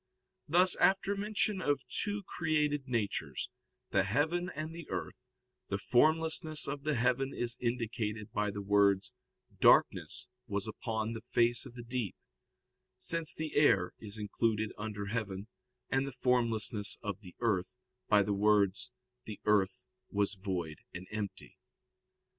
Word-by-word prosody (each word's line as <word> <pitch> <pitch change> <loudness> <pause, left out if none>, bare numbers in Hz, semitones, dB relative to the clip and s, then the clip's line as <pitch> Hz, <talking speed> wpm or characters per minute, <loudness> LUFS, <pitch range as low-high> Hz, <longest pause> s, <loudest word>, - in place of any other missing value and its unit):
Thus 180 +4 +5
after 195 +1 +3
mention 205 -1 0
of 145 -4 +1
two 205 -1 -2
created 150 -5 0
natures, 100 - -2 0.4
the 95 - +4
heaven 155 - +1
and 155 +2 -4
the 170 -2 -9
earth, 125 0 -5 0.4
the 100 - 0
formlessness 155 +6 +3
of 140 0 -3
the 150 -1 +1
heaven 130 +3 +1
is 120 -1 -1
indicated 115 -3 -2
by 105 0 0
the 100 0 -5
words, 100 -1 +3 0.5
"darkness - - +4 0.2
was 100 -1 -2
upon 110 0 -3
the 115 - -6
face 120 +2 +3
of 120 - -14
the 120 - -7
deep," 120 -4 -3 0.8
since 165 +5 -1
the 155 -1 -4
air 100 -12 +4
is 105 0 -7
included 110 0 0
under 105 -1 -4
heaven; 100 -2 -3 0.5
and 135 +1 +2
the - - -4
formlessness 115 -4 +2
of 100 -1 -4
the 90 -4 -12
earth, 110 -1 0 0.3
by 105 -1 +6
the 100 +1 0
words, 105 +3 +3 0.3
"the 105 -2 -7
earth 100 -3 +2 0.2
was 100 0 +1
void 90 -6 -4 0.2
and 90 +1 -6
empty." 105 -2 -5
115 Hz, 140 wpm, -33 LUFS, 100-145 Hz, 0.8 s, by